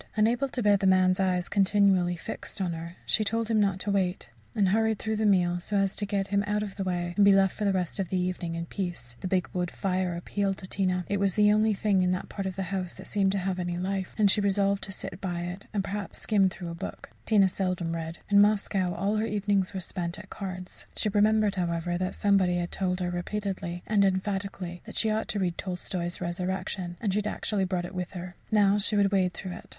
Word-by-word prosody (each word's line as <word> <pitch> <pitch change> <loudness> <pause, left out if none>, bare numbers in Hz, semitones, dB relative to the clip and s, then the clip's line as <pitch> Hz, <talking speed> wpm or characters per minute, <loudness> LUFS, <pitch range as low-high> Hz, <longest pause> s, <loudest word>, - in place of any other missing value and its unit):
Unable 235 +5 +2
to 250 -2 -3
bear 205 -1 +5
the 195 - +1
man's 185 0 +4
eyes 180 -2 +1
continually 195 -3 +3
fixed 170 - -6
on 180 -3 -1
her, 165 +1 -7
she 215 - +2
told 225 +2 -1
him 220 - +3
not 195 -2 +2
to 205 - -1
wait, 185 -9 -1 0.2
and 200 -3 +3
hurried 220 +2 +2
through 220 +1 -2
the 215 0 +2
meal 175 -3 +3
so 205 +3 -1
as 195 -1 +1
to 205 - -1
get 200 -1 -1
him 200 0 +2
out 210 0 0
of 200 -2 -6
the 195 - -2
way, 175 -2 -2
and 205 - +5
be 200 - +7
left 195 -1 +3
for 210 - -2
the 200 - +3
rest 185 0 -2
of 190 - -1
the 185 - 0
evening 180 -2 -2
in 170 0 -3
peace. 175 -10 -5
The - - -4
big 185 -1 +1
wood 180 -1 -1
fire 185 -2 -1
appealed 195 +3 -1
to - - -8
Tina 185 -2 0
it 200 - 0
was 195 -2 +1
the 210 0 +5
only 215 0 +3
thing 195 -1 +2
in 180 - +2
that 180 - -4
part 195 -1 -4
of 190 - -4
the 195 - -2
house 185 -2 -2
that 190 - -10
seemed 195 -2 +1
to - - 0
have 185 -1 -1
any 175 -1 -2
life 190 +1 -3
and 205 -3 +5
she 210 - +3
resolved 200 0 +2
to 195 - -7
sit 195 0 -7
by 175 -3 -2
it, 180 +3 -6
and, 205 -3 -1
perhaps, 200 +1 -4
skim 200 -3 +3
through 175 -2 -7
a - - -5
book. 170 - -7 0.2
Tina 205 -3 +5
seldom 180 -3 -2
read 165 0 -4
in 200 -1 +6
Moscow, 200 -3 +2
all 200 +4 0
her 220 +1 0
evenings 205 -2 +1
were - - -1
spent 175 -1 -3
at - - -12
cards. 185 -2 -7
She 215 - +1
remembered, 210 0 +3
however, 175 0 -1
that 185 0 -2
somebody 195 -3 +3
had 175 0 -2
told 185 -1 -1
her 180 0 -1
repeatedly, 180 -1 -3
and 210 -2 +3
emphatically, 190 -2 -1
that - - -7
she 220 - +2
ought 220 +1 -1
to - - -2
read 175 -3 -1
Tolstoy's 180 -1 -3
"Resurrection," 180 0 -3
and 205 -5 0
she 210 - +2
had 210 - -2
actually 205 -2 -1
brought 180 -2 -1
it 175 - -8
with 180 0 -4
her. 180 -1 -6 0.2
Now 205 -1 +4
she 210 +1 +3
would 200 -1 +3
wade 185 -3 +2
through 185 - -6
it. - - -14
190 Hz, 245 wpm, -28 LUFS, 180-205 Hz, 0.2 s, be